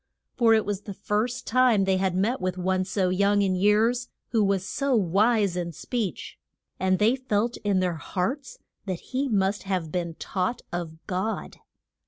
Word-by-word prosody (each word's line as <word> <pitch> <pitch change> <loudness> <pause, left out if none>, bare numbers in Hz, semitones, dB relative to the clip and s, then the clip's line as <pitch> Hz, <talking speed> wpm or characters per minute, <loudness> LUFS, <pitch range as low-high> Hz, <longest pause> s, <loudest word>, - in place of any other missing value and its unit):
For 230 -2 +5
it 220 - +1
was 205 -1 -2
the 200 -2 -8
first 215 +5 -1
time 250 -5 +4
they 190 -1 +2
had 185 -1 0
met 210 +7 0
with 185 0 -2
one 185 +1 0
so 185 -1 0
young 200 +2 +3
in 190 -1 +1
years 220 +6 +2 0.2
who 225 -3 +2
was 195 -1 0
so 275 +2 0
wise 205 0 +2
in 170 -1 -3
speech, 205 - -4 0.4
and 185 0 +2
they 220 +5 +3
felt 240 -3 -1
in 200 -3 +1
their 180 -3 0
hearts 210 - -3 0.3
that 185 -3 -2
he 270 +2 0
must 200 -2 +1
have 185 -5 -2
been 170 -2 -2
taught 190 +9 -2
of 165 -2 -5
God. 190 +5 -3
200 Hz, 175 wpm, -26 LUFS, 185-225 Hz, 0.4 s, For